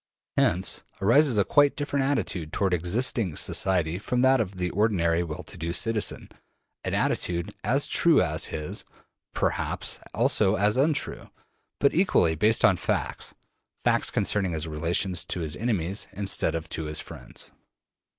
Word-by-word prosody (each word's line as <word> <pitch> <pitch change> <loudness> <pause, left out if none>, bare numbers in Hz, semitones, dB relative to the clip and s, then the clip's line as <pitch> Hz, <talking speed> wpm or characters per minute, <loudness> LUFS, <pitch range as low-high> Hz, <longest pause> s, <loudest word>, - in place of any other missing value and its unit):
Hence 90 +3 +2 0.2
arises 120 +5 +4
a 100 - +3
quite 145 +5 +4
different 145 -1 -1
attitude 90 - -2
toward 95 +1 0
existing 95 +1 0
society 90 -1 +1
from 125 +4 -1
that 130 0 +5
of 100 -3 -5
the 90 -1 -2
ordinary 90 -5 +1
well 80 -3 -5
to - - -10
do 85 +1 -3
citizen: 110 +5 -1 0.5
an - - -2
attitude 85 -1 -1
as - - +2
true - - +3
as - - +1
his, 75 -1 -3 0.5
perhaps - - -2
also 95 +2 +2
as 105 +1 +2
untrue, 145 +3 -1 0.5
but 140 - +3
equally 165 - +3
based 105 +8 +3
on - - +4
facts, - - -3 0.5
facts - - +2
concerning 95 -4 0
his 80 0 -2
relations 85 +3 -1
to 90 - -4
his 75 -2 -2
enemies 100 -3 -1
instead 95 -5 0
of 80 0 -4
to 80 - -4
his 75 0 -1
friends. - - -9
95 Hz, 150 wpm, -26 LUFS, 85-115 Hz, 0.5 s, that